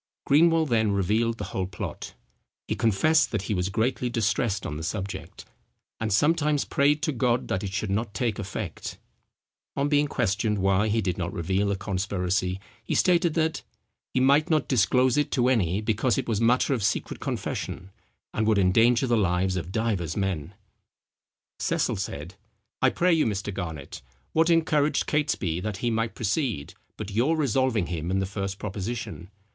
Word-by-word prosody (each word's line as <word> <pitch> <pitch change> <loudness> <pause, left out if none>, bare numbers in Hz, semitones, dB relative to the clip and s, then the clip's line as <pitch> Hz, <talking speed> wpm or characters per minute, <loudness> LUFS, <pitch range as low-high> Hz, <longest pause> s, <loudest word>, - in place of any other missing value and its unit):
Greenwell 165 +2 +4
then 110 -6 +2
revealed 110 +4 +1
the - - -5
whole 95 -1 -1
plot. 90 -2 -7 0.5
He - - 0
confessed 135 +7 +3
that 105 -4 -1
he 105 - -2
was 90 0 0
greatly 120 +4 0
distressed 115 -1 0
on 75 - -4
the 75 - -5
subject, 100 +4 -5 0.5
"and 110 -1 -2
sometimes 150 - +2
prayed 145 +2 +2
to 155 - +1
God 125 -2 0
that 95 - -1
it 100 - -3
should 100 +1 -2
not 105 +1 -2
take 120 -5 -1
effect." 95 -3 -5 0.8
On 140 +1 0
being 145 0 +3
questioned 105 -3 0
why 95 +2 +2
he 110 +1 +1
did 90 -3 -2
not 85 -1 -2
reveal 95 +4 0
the 100 - +1
conspiracy 95 -1 -1 0.2
he - - -2
stated 170 -3 +3
that, 160 -1 0 0.5
"he - - +1
might 140 +4 +4
not 155 -3 +2
disclose 130 0 +3
it 150 - +2
to 125 -1 +3
any, 100 -6 +1
because 110 +2 +1
it - - -2
was 110 -2 0
matter 125 +4 +3
of 120 -6 -1
secret - - -1
confession, 95 +2 -4 0.4
and 110 0 0
would 110 -2 +3
endanger 115 +6 +4
the 120 -2 +2
lives 95 -2 +1
of 90 0 -4
divers 100 -8 -1
men." 95 -3 -2 1.0
Cecil - - 0
said, 85 -3 -5 0.5
"I 130 - +5
pray 180 +6 +2
you, 160 -6 +3
Mr. 100 -1 -3
Garnet, 80 -7 -6 0.3
what 160 +1 +3
encouraged 160 -3 +2
Catesby 140 - 0
that 105 +1 -4
he 120 +3 -1
might 115 0 -1
proceed, 110 - -1 0.2
but 105 -1 -6
your 130 +10 +2
resolving 130 - +1
him 85 -1 -4
in 95 - +1
the 95 - 0
first 95 0 -4
proposition? 105 -2 -5
110 Hz, 170 wpm, -26 LUFS, 95-130 Hz, 1.0 s, I